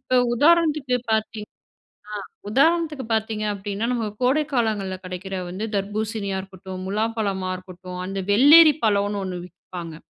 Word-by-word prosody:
இப்ப 255 Hz, -1 st, +2 dB
உதாரணத்துக்கு 305 Hz, -3 st, +3 dB, 0.2 s
பார்த்தீங் 220 Hz, -1 st, -2 dB, 0.6 s
ஆ -, -, -6 dB, 0.4 s
உதாரணத்துக்கு 310 Hz, +2 st, +2 dB
பார்த்தீங்க 220 Hz, -1 st, -1 dB
அப்படினா, 200 Hz, +2 st, -4 dB
நம்ம 235 Hz, -2 st, -1 dB, 0.2 s
கோடைக் 295 Hz, +4 st, +2 dB
காலங்கள்ல 210 Hz, -6 st, 0 dB
கிடைக்கிற 185 Hz, +1 st, -6 dB
வந்து 190 Hz, +5 st, -4 dB
தர்பூசணியா 205 Hz, 0 st, -2 dB
இருக்கட்டும், 190 Hz, -1 st, -9 dB
முலாம் 220 Hz, +3 st, -1 dB
பழமா 190 Hz, -3 st, -1 dB
இருக்கட்டும், 185 Hz, 0 st, -9 dB
அந்த 195 Hz, +1 st, -4 dB
வெள்ளேரி 300 Hz, +7 st, +8 dB
பழம்னு 205 Hz, -1 st, +1 dB
ஒன்னு 185 Hz, -1 st, -4 dB
விப்பாங்க. 170 Hz, -3 st, -9 dB
210 Hz, 130 wpm, -23 LUFS, 190-250 Hz, 0.6 s, வெள்ளேரி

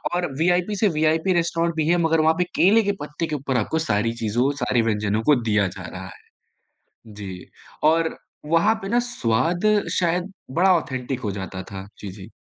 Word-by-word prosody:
और 175 Hz, -5 st, -1 dB
वीआईपी 180 Hz, +4 st, +2 dB
से 215 Hz, -, +4 dB
VIP 160 Hz, +4 st, +2 dB
restaurant 170 Hz, -1 st, 0 dB
भी 155 Hz, -1 st, 0 dB
है 175 Hz, +1 st, +3 dB
मगर 160 Hz, -1 st, +3 dB
वहाँ 160 Hz, +1 st, +4 dB
पे 180 Hz, -, +3 dB
केले 215 Hz, +5 st, +5 dB
के 200 Hz, -, +1 dB
पत्ते 150 Hz, +2 st, -4 dB
के 155 Hz, -, -3 dB
ऊपर 135 Hz, -2 st, -2 dB
आपको 160 Hz, +9 st, 0 dB
सारी 115 Hz, +2 st, +1 dB
चीज़ों, 120 Hz, +6 st, +1 dB
सारी 120 Hz, -1 st, +2 dB
व्यंजनों 105 Hz, -1 st, 0 dB
को -, -, +7 dB
दिया 105 Hz, -3 st, +2 dB
जा -, -, -8 dB
रहा -, -, -8 dB
है। -, -, -15 dB, 0.9 s
जी, 95 Hz, -3 st, -8 dB, 0.4 s
और 160 Hz, +1 st, +2 dB, 0.3 s
वहाँ 170 Hz, +8 st, +3 dB
पे 195 Hz, -, -4 dB
ना 240 Hz, +3 st, +2 dB
स्वाद 130 Hz, -, 0 dB, 0.4 s
शायद 180 Hz, +2 st, 0 dB, 0.2 s
बड़ा 185 Hz, +7 st, +4 dB
ऑथेंटिक 130 Hz, -4 st, -4 dB
हो 105 Hz, -, -3 dB
जाता 95 Hz, -1 st, -6 dB
था, 95 Hz, 0 st, -9 dB
जी, 100 Hz, -, -7 dB
जी। 100 Hz, +2 st, -11 dB
155 Hz, 190 wpm, -23 LUFS, 110-170 Hz, 0.9 s, को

